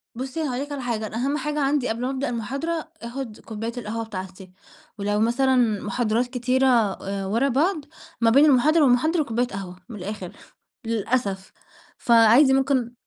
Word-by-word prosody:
بُصّي 265 +6 -4
أنا 300 - -1
هاقول 250 +1 -3
لِك 290 - -14
على 280 -2 -4
حاجة 225 -3 -2
أنا - - -9
أهم 275 +4 0
حاجة 300 -1 -2
عندي 275 -2 +1
قبل 225 +2 -3
ما 255 - -1
ابدأ 270 0 -2
المحاضرة 275 +8 -3
آخُد 235 -1 -6
كوباية 225 +1 -5
القهوة 225 0 -4
بتاعتي، 190 -2 -8 0.5
ولو 205 +1 -1
مثلًا 260 +4 +2 0.3
محاضرات 230 +3 0
كتيرة 255 +1 +1 0.4
آآ 195 0 -4
ورا 230 +8 +1
بعض 305 +3 0 0.4
ما 230 - +5
بين 275 +6 +6
المحاضرة 300 +3 +4
والمحاضرة 300 +6 +3
كوباية 245 -1 -1
قهوة، 195 -4 -7
من 230 - -8
الآخر 190 -1 -6 0.5
للأسف. 215 -3 -2 0.5
فعادي 235 +4 +5
ممكن 265 -3 +1
245 Hz, 165 wpm, -24 LUFS, 220-275 Hz, 0.5 s, بين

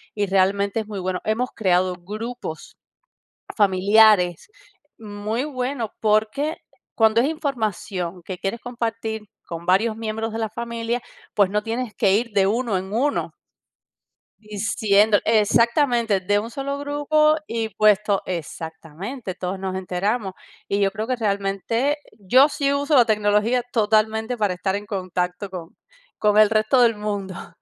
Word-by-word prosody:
y 205 - 0
realmente 195 +2 +1
es 215 - -10
muy 205 -2 -5
bueno. 185 0 -2
Hemos 230 +4 0
creado 185 -2 +1
grupos 210 -1 -7 0.8
familiares 200 - +4 0.5
muy 215 +2 -3
buenos, 255 -4 -3
porque 220 +8 +1 0.4
cuando 220 0 +4
es 260 - +2
información 215 - -3
que 185 -2 -6
quieres 195 +6 -4
compartir 225 -2 -4 0.2
con 170 0 -7
varios 215 +5 +2
miembros 225 0 -3
de 225 - -3
la 220 -1 -1
familia, 235 +1 -3 0.3
pues 200 -3 +3
no 210 +2 0
tienes 230 0 -3
que 195 -3 +3
ir 230 +4 +1
de 195 -1 +3
1 225 -1 0
en 190 +2 -6
1 280 +6 0 1.1
diciendo 210 0 +2
exactamente, 230 0 +3
de 205 +3 +1
un 225 +3 -3
solo 280 +2 -3
grupo 295 +2 +2
y 225 -1 -2
puesto 210 -1 +3
exactamente, 170 - -6
todos 185 +2 -4
nos 190 -1 -3
enteramos. 190 +3 -2 0.3
Y 200 - 0
yo 195 -1 +2
creo 220 +2 -4
que 255 - 0
realmente 215 +6 -1 0.2
yo 255 +9 +5
sí 280 -1 -1
uso 285 +1 +1
la 245 - +7
tecnología 215 +3 +2
totalmente 220 +1 +1
para 205 -4 +1
estar 190 +2 -2
en 205 +1 -5
contacto 185 -1 -3
con 180 -3 -9 0.4
con 210 -1 +3
el 215 -1 +7
resto 215 +4 +3
del 230 -2 +4
mundo. 205 -3 -5
215 Hz, 145 wpm, -22 LUFS, 195-235 Hz, 1.1 s, la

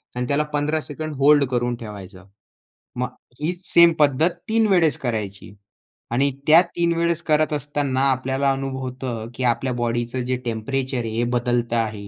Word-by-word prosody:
आणि 125 0 -2
त्याला 145 +2 +1
15 150 +2 0
second 155 +1 -6
hold 145 +1 +5
करून 120 -1 0
ठेवायचं. 100 -4 -10 0.7
मग 125 +1 -1 0.3
हीच 175 +4 -3
सेम 170 0 +7
पद्धत 150 +3 +3 0.2
3 225 0 +3
वेळेस 175 -6 +3
करायची 105 -6 -4 0.6
आणि 135 +4 +2 0.2
त्या 160 +3 +8
3 170 -1 +1
वेळेस 170 0 +1
करत 155 0 +3
असताना 145 -2 -1
आपल्याला 135 +1 0
अनुभवतं 130 -4 -4
की 130 - -4
आपल्या 125 +1 +1
बॉडीचं 120 +1 -2
जे 130 0 -1
टेम्परेचर 130 +4 -2
आहे - - -3
हे 115 - +1
बदलत 120 -1 -1
आहे. 110 -3 -2
130 Hz, 155 wpm, -22 LUFS, 120-150 Hz, 0.7 s, त्या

